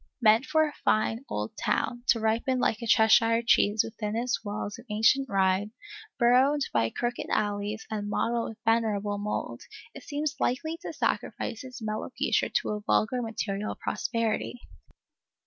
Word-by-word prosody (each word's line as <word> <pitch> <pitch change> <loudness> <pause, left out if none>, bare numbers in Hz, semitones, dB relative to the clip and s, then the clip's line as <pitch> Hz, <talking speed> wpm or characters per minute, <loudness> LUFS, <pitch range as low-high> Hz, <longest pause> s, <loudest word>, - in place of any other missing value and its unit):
Meant 225 +2 +4
for 315 0 +3
a 295 - -7
fine 225 +3 +1
old 105 +1 -4
town, 240 - -1
to 230 - +4
ripen 225 +4 +1
like 240 -2 0
a 235 - -4
Cheshire 225 +1 +5
cheese 210 -2 +4
within 215 -1 -4
its 240 +1 -1
walls 205 +1 -5
of 240 - -13
ancient 225 +6 +3
rind, 195 +1 +1 0.4
burrowed 260 +4 +4
by 115 -1 +2
crooked 240 - -3
alleys 205 +1 -1
and 205 -1 -3
mottled 235 +2 0
with 225 - -10
venerable 210 -3 +1
mould, 210 +1 -4 0.3
it - - -10
seems 300 +1 -3
likely 280 +6 -1
to - - -5
sacrifice 225 - -2
its 255 -2 -9
mellow 215 0 -3
future - - +1
to - - -1
a 210 0 -3
vulgar 230 +4 +1
material 215 -2 -3
prosperity. 230 +2 -2
225 Hz, 155 wpm, -28 LUFS, 210-245 Hz, 0.4 s, Cheshire